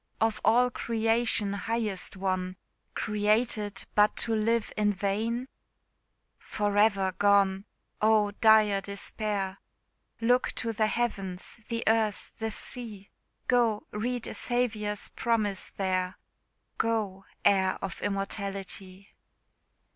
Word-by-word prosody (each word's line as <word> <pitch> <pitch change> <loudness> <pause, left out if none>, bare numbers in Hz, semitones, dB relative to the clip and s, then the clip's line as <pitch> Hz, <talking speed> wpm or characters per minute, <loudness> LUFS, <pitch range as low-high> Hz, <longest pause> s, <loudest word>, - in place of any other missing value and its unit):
Of 225 -1 +1
all 245 +3 +4
creation, 225 -3 +1
highest 210 -2 -2
one, 185 -1 -1 0.4
Created 210 0 0
but 210 0 +4
to 230 - 0
live 225 +1 +1
in 210 -1 +2
vain? 220 +6 -1 0.9
For 205 -1 -2
ever 200 -2 +4
gone! 200 -1 +4 0.4
oh, 215 -1 +4
dire 215 -3 +6
despair! 200 -1 -3 0.6
Look 245 +2 +2
to 230 -1 -3
the 215 0 +2
heavens, 200 -6 -2
the 230 -1 -2
earth, 220 -2 +1
the 225 0 -1
sea 215 -3 -8 0.4
Go, 235 -4 +2
read 240 +3 -2
a - - -5
Saviour's 215 -4 -1
promise 215 -5 0
there 185 -1 -1 0.6
Go, 210 -4 -1 0.2
heir 190 -1 +4
of 190 - -5
Immortality! 195 -1 -4
210 Hz, 105 wpm, -29 LUFS, 195-225 Hz, 0.9 s, dire